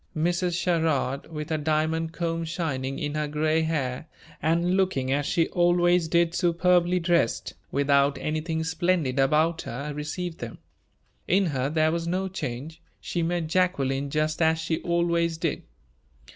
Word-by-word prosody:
Mrs. 175 +2 0
Sherrard, 160 -6 0
with 150 +1 -5
her 155 - 0
diamond 160 +2 0
comb 165 -1 -2
shining 150 -6 -3
in 145 0 -3
her 150 0 -1
gray 155 +2 +1
hair, 150 -3 -2 0.3
and 170 +3 +2
looking 180 -9 +1
as 145 +1 0
she 165 -1 +2
always 175 -1 +3
did 170 +1 +2
superbly 180 0 +2
dressed, 170 -8 +1 0.2
without 140 0 +3
anything 155 +2 -2
splendid 160 -4 0
about 155 +5 +2
her, 140 +5 -5
received 165 +4 -4
them. 115 -1 -7 0.7
In 195 +2 +3
her 135 -5 -1
there 155 +1 +2
was 170 0 -2
no 185 +2 -1
change. 155 -2 -6 0.2
She 175 - -3
met 170 0 0
Jacqueline 145 -6 0
just 155 +2 -1
as 160 0 +4
she 160 0 -2
always 170 -1 +1
did. - - -2
160 Hz, 145 wpm, -26 LUFS, 150-170 Hz, 0.7 s, as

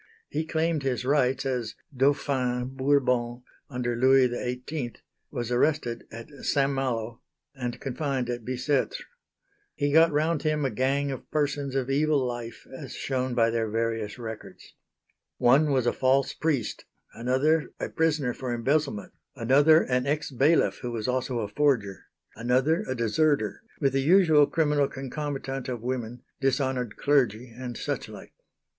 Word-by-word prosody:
He 155 +2 -2
claimed 160 -1 0
his 125 -3 -2
rights, 135 -1 +2
as 125 -5 -2 0.2
"Dauphin" 130 -2 +1
Bourbon 125 -3 +1 0.3
under 125 -3 -2
Louis 130 +1 +5
XVIII, 125 +1 -4 0.4
was 120 0 -4
arrested 125 -2 0
at 115 +1 -8 0.2
St. 140 0 +2
Malo, 120 -4 -2 0.3
and 125 -3 -5
confined 135 -1 -2
at 120 -1 -4
Bicêtre. 130 +3 -1 0.8
He 145 0 0
got 165 +1 +6
round 155 +1 +1
him 155 -2 0
a 135 - 0
gang 140 +2 0
of 135 - -7
persons 145 -2 -1
of 135 0 -1
evil 150 +2 +2
life, 120 -2 -6
as 135 -1 -8
shown 130 -2 -2
by 115 -1 +3
their 115 -1 -1
various 115 -1 -2
records. 110 -2 -9 0.6
One 135 +5 +4
was 130 -3 +2
a 120 - +2
false 135 +1 +2
priest, 145 -8 -2 0.3
another 135 +7 +1
a - - -2
prisoner 155 -6 +1
for 125 -1 -3
embezzlement, 135 -3 -1 0.2
another 145 +6 +5
an 125 +1 0
ex 150 +1 -1
bailiff 140 +6 +3
who 125 - -4
was 115 -1 -3
also 125 -1 -1
a 105 - -2
forger, 110 -5 0 0.3
another 130 - +2
a 130 - -1
deserter; 115 0 +1 0.2
with 135 -3 +1
the 135 - +2
usual 160 -2 +5
criminal 150 -3 +2
concomitant 135 -1 -5
of 120 -3 -4
women, 120 -1 -4 0.2
dishonoured 130 -4 0
clergy 125 -5 +1
and 125 -2 -6
such - - -3
like. - - -11
130 Hz, 145 wpm, -27 LUFS, 120-145 Hz, 0.8 s, got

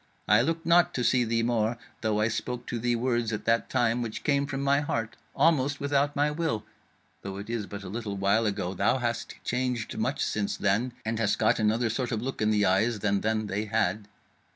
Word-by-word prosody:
I 105 +3 +6
looked 165 +5 -1
not 170 +1 +4
to 125 - 0
see 125 0 +3
thee 115 0 0
more; 115 -1 +1 0.2
though 110 -1 0
I 110 - +3
spoke 120 +2 -3
to 120 - -3
thee 120 +1 +1
words 120 -1 0
at 105 - -4
that 115 0 +2
time 120 0 +1
which 115 -2 -5
came 140 -1 +1
from 135 -1 -3
my 140 0 +3
heart, 115 -6 -2 0.2
almost 145 -3 +2
without 140 0 +1
my 145 +1 +2
will. 150 -9 -1 0.6
Though 95 0 -6
it 100 +3 -6
is 110 -4 -3
but 100 -1 -7
a - - -7
little 105 0 -4
while 100 +3 +2
ago, 100 -3 -2
thou 100 +7 +2
hast 120 -2 -3
changed 125 -2 -2
much - - 0
since 105 -2 -2
then, 105 +5 +1
and 110 0 -1
hast 105 -2 +1
got - - +2
another 110 +2 +1
sort 120 +1 -2
of 110 - -1
look 130 +2 -4
in 110 - +3
the 105 -1 +3
eyes 105 +4 +2
than 100 -2 +1
then 110 0 0
they 105 +1 -2
had. 100 0 0
115 Hz, 220 wpm, -28 LUFS, 105-125 Hz, 0.6 s, I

